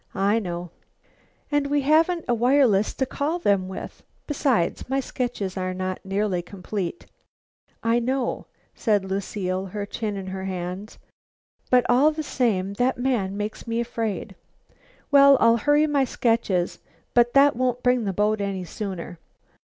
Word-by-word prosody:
"I 200 +3 +2
know." 175 -4 -5 0.8
"And 290 -1 +1
we 290 0 +1
haven't 325 +4 +3
a 240 - +2
wireless 235 -4 +3
to 265 - 0
call 290 +6 -2
them 200 - +1
with. 190 - -8 0.2
Besides, 265 - 0
my 270 +1 +1
sketches 240 -7 -3
are 185 0 -2
not 185 0 -4
nearly 195 -1 -1
complete." 190 - -5 0.8
"I 230 +1 +3
know," 255 +1 -2 0.3
said 210 -5 +1
Lucile, 190 -1 -3
her 205 +2 -4
chin 210 0 -4
in 195 - -5
her 190 0 -5
hands. 185 +2 -5 0.7
"But, 250 -1 +4
all 260 +5 +5
the 310 0 -4
same, 205 -9 0
that 255 +1 +2
man 235 -7 -1
makes 210 +3 -5
me 230 0 -1
afraid." 225 -4 -3 0.8
"Well, 280 -1 +7
I'll 230 0 +5
hurry 290 +4 +3
my 285 -3 +2
sketches, 225 -8 0 0.3
but 240 +1 +3
that 280 0 +6
won't 250 0 -1
bring 250 -2 +2
the 195 - 0
boat 210 +2 +1
any 195 -2 -2
sooner." 180 -2 -6
220 Hz, 150 wpm, -24 LUFS, 190-260 Hz, 0.8 s, Well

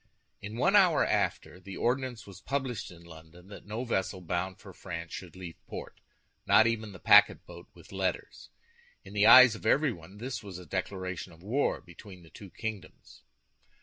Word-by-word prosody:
In 105 +2 -7
one 195 +11 +2
hour 185 -6 +5
after, 90 - -1
the 95 +1 -9
ordinance 125 -2 -2
was 100 -2 -13
published 130 -6 -3
in 85 -1 -14
London 85 +2 -15
that 100 - -12
no 110 +4 -4
vessel 95 -4 -2
bound 90 +2 -3
for 95 -3 -13
France 85 -3 -8
should 90 -3 -8
leave 90 -3 -10
port, - - -9 0.5
not 110 - +6
even 110 -2 -1
the 95 - -11
packet - - +5
boat - - -12
with - - -16
letters. 95 -2 -4 0.5
In 100 - -13
the 105 +1 +3
eyes 130 -3 +9
of 105 - -10
everybody 110 - 0
this 120 0 -6
was 100 -4 -9
a 90 - -11
declaration 95 +1 -5
of 80 +2 -18
war 125 +8 -1
between 90 +1 -14
the 80 - -18
two 100 - -12
kingdoms. 110 0 -8
100 Hz, 180 wpm, -29 LUFS, 90-115 Hz, 0.5 s, eyes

